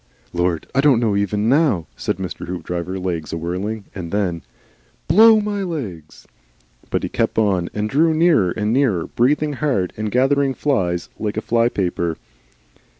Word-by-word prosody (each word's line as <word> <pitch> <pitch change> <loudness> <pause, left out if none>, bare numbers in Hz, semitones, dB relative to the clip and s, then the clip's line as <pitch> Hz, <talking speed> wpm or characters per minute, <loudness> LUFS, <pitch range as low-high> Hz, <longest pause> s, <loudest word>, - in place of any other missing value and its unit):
"Lord! 85 -1 0
I 135 - +3
don't 140 -5 +4
know 110 -4 +1
even 105 +1 0
now," 135 - +2
said - - -2
Mr. 95 -3 -6
Hoopdriver 90 +1 -4
(legs 90 -4 -3
awhirling), 90 +6 -3
and 85 -4 -6
then, 95 -5 -1 0.7
"Blow 220 +2 +7
my 205 -1 -2
legs!" 110 - -6 0.6
But - - -1
he - - -2
kept - - -1
on 95 -5 +1
and 105 0 -2
drew 155 +8 +3
nearer 155 - +3
and 105 +4 -1
nearer, 120 -11 +2
breathing 150 +5 +1
hard 130 - -1
and 110 0 -2
gathering 135 +1 +2
flies 90 - -1
like 105 -1 -3
a - - +2
flypaper. 95 -8 0
105 Hz, 150 wpm, -20 LUFS, 90-140 Hz, 0.7 s, Blow